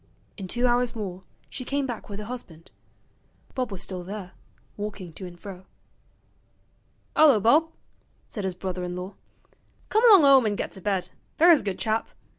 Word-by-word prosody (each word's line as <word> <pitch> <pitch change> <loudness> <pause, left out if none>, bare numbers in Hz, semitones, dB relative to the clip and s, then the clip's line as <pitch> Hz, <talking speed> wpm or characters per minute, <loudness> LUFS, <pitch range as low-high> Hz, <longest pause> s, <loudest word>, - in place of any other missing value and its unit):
In 195 -3 -7
two 240 +6 0
hours 245 0 +2
more 190 -4 -5 0.3
she 255 - -7
came 275 +2 -1
back 240 -5 -6
with 200 - -6
her 210 - -6
husband. 195 -9 -9 0.8
Bob 255 -4 -2
was 195 - -5
still 185 -2 -6
there, 190 0 -7 0.4
walking 200 -5 -6
to 185 +3 -8
and 175 -1 -13
fro. 190 -1 -10 1.5
''Ullo, 290 -8 +6
Bob,' 295 +10 +4 0.6
said 205 - -6
his 190 -2 -2
brother 185 0 -4
in 180 0 -4
law; 180 +2 -6 0.8
'come 435 +2 +2
along 385 -8 +8
'ome 270 -4 +7
an' 205 - 0
get - - -3
to 190 - -10
bed, 185 -2 -1 0.3
there's 335 -1 +7
a - - -13
good 195 -3 -3
chap. 220 0 -1
205 Hz, 175 wpm, -26 LUFS, 185-250 Hz, 1.5 s, along